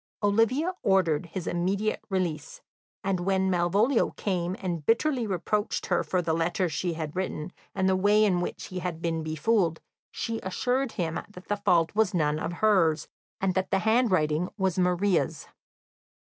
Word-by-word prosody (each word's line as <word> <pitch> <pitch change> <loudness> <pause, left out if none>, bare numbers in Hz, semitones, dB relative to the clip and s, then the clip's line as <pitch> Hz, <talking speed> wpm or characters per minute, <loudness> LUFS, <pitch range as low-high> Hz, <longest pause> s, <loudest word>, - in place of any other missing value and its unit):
Olivia 230 - +2
ordered 180 -5 +2
his 175 +1 -5
immediate 195 +5 -1
release, 190 - -2 0.4
and 195 -2 0
when 190 +1 +1
Malvolio 200 +9 +2
came 180 -2 -1
and 175 -5 -3
bitterly 240 - +1
reproached 205 +2 -1
her - - +1
for 180 -1 -1
the 160 -1 0
letter 175 +3 0
she 165 +2 -2
had 155 -1 -5
written, 180 -3 -3 0.2
and 190 -1 +1
the 190 - +3
way 205 +3 +4
in 180 -4 +2
which - - -4
he 185 - -4
had 175 -2 -4
been 165 -1 -1
befooled, 160 +2 +1 0.3
she 225 -1 -3
assured 250 +7 -1
him 165 -2 -2
that 185 -3 -13
the 205 - +2
fault 180 -5 +2
was 215 -3 +2
none 150 -2 +1
of 165 - -3
hers, 175 -5 +2 0.3
and 190 -1 +1
that 190 +1 -1
the 195 - +2
handwriting 185 -8 +2
was 190 -2 0
Maria's. 180 -3 +1
185 Hz, 160 wpm, -27 LUFS, 170-205 Hz, 0.4 s, way